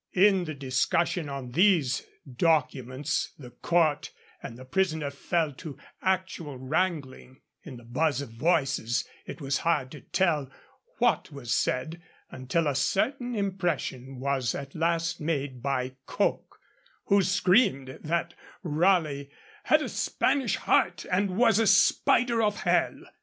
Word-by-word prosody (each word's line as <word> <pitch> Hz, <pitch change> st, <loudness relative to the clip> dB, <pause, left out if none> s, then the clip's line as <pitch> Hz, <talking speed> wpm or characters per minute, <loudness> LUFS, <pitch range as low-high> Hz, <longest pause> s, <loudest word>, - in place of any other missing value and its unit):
In 190 Hz, -1 st, +4 dB
the 155 Hz, -2 st, -5 dB
discussion 140 Hz, +5 st, 0 dB
on 135 Hz, -3 st, -6 dB
these 170 Hz, -5 st, +2 dB, 0.2 s
documents 130 Hz, -2 st, 0 dB
the 125 Hz, -4 st, -11 dB
court 155 Hz, +3 st, +1 dB, 0.3 s
and 115 Hz, -, -8 dB
the 130 Hz, -, -11 dB
prisoner 160 Hz, -1 st, 0 dB
fell 155 Hz, +1 st, -1 dB
to 140 Hz, +1 st, -9 dB, 0.2 s
actual 185 Hz, -6 st, -2 dB
wrangling; 135 Hz, -2 st, -3 dB, 0.2 s
in 135 Hz, -6 st, -10 dB
the 120 Hz, -, -13 dB
buzz 140 Hz, +4 st, 0 dB
of 140 Hz, -5 st, -6 dB
voices 130 Hz, -3 st, 0 dB, 0.2 s
it -, -, -7 dB
was 140 Hz, -1 st, -1 dB
hard 145 Hz, -6 st, 0 dB
to 150 Hz, -, -10 dB
tell 155 Hz, -7 st, 0 dB, 0.5 s
what 240 Hz, -8 st, +1 dB
was 135 Hz, -5 st, -4 dB
said, 160 Hz, +6 st, -1 dB, 0.3 s
until 130 Hz, +6 st, -1 dB
a 145 Hz, -, +1 dB
certain 245 Hz, -, 0 dB
impression 175 Hz, -, -2 dB
was 135 Hz, -3 st, -1 dB
at 140 Hz, 0 st, -7 dB
last 165 Hz, +1 st, -1 dB
made 140 Hz, -5 st, -2 dB
by 130 Hz, -1 st, -1 dB, 0.2 s
Coke, -, -, -2 dB, 0.5 s
who 200 Hz, 0 st, +4 dB
screamed 185 Hz, -, +3 dB
out -, -, -13 dB
that 170 Hz, +2 st, -2 dB, 0.3 s
Raleigh 155 Hz, -4 st, +1 dB, 0.4 s
'had -, -, +4 dB
a -, -, -3 dB
Spanish 265 Hz, -6 st, 0 dB
heart 175 Hz, -4 st, +1 dB
and 185 Hz, 0 st, 0 dB
was 225 Hz, -3 st, +4 dB
a 225 Hz, -, +3 dB
spider 230 Hz, +4 st, +4 dB
of 210 Hz, -1 st, 0 dB
hell.' -, -, +1 dB
155 Hz, 135 wpm, -27 LUFS, 135-185 Hz, 0.5 s, In